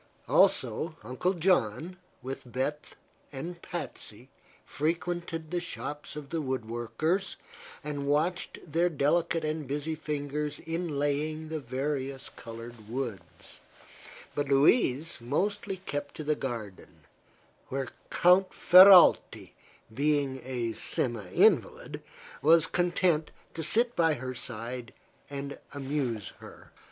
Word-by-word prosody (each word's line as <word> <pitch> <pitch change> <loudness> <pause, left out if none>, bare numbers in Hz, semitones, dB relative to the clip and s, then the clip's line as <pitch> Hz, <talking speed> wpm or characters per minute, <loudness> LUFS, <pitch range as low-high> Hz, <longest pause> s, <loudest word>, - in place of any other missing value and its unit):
Also - - +2
Uncle 180 +9 -1
John, 170 - +1 0.3
with 130 +1 -5
Beth 130 +5 -4 0.4
and 170 +5 -6
Patsy, - - -6 0.3
frequented 165 0 -2
the 175 -1 0
shops 150 -4 -6
of 150 -2 -8
the 165 - -1
wood 130 -5 -3
workers 155 - -1 0.5
and 145 -1 -4
watched 155 +5 0
their 170 +3 +3
delicate 160 +2 +1
and 155 -2 -3
busy 145 +3 -2
fingers 150 -1 -3
inlaying 155 -1 -2
the 160 -1 -3
various 135 +1 -3
colored 115 -1 -10
woods; 115 -8 -6 0.7
but 145 -1 -2
Louise 140 - +3
mostly 195 - -1
kept 145 -5 -5
to 155 - -5
the 150 +1 +2
garden, 115 -9 -6 0.6
where 135 -1 -3 0.2
Count 185 +2 +5
Ferralti, 185 0 +7 0.4
being 140 -1 +1
a 120 -3 -2
semi 115 -6 -1
invalid, - - +2 0.4
was 160 +2 +6
content 175 -3 +1 0.2
to 160 - -4
sit 235 +8 +2
by 165 -2 +3
her 130 0 -5
side 120 +1 -5 0.3
and 140 0 -6 0.2
amuse 135 -6 -2
her. - - -13
145 Hz, 110 wpm, -29 LUFS, 130-165 Hz, 0.7 s, Ferralti